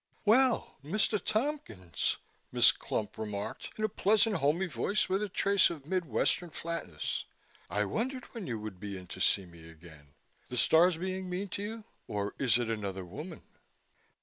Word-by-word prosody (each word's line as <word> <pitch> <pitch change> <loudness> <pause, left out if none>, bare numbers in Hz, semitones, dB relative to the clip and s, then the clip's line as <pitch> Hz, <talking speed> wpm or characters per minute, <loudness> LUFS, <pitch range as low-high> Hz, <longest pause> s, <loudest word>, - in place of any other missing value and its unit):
"Well, 245 +3 +4
Mr. 205 +5 +2
Tompkins," 215 - -1 0.3
Miss - - +7
Clump 105 0 -4
remarked 105 -2 -4
in 215 - -3
a - - +4
pleasant, 210 0 +3
homey 155 +5 +2
voice 200 +4 0
with 190 +2 +1
a 210 - -1
trace 200 +1 +4
of 155 -5 -7
Mid 185 +2 0
Western 155 +7 +1
flatness, 170 +1 -4 0.4
"I - - +1
wondered 255 +3 -2
when 220 -8 -5
you 115 - -2
would 105 -3 -7
be 100 -1 -5
in 95 - -9
to - - -8
see 95 - +3
me 85 -2 -13
again. 80 -3 -15 0.3
The 125 - -4
stars 165 +6 +5
being 185 +1 -3
mean 190 +2 -3
to 200 - -3
you? 220 +2 -5 0.2
Or 100 0 -2
is 125 -4 +4
it 120 -2 -1
another 100 -4 -3
woman?" 150 - -8
165 Hz, 170 wpm, -31 LUFS, -, 0.4 s, Miss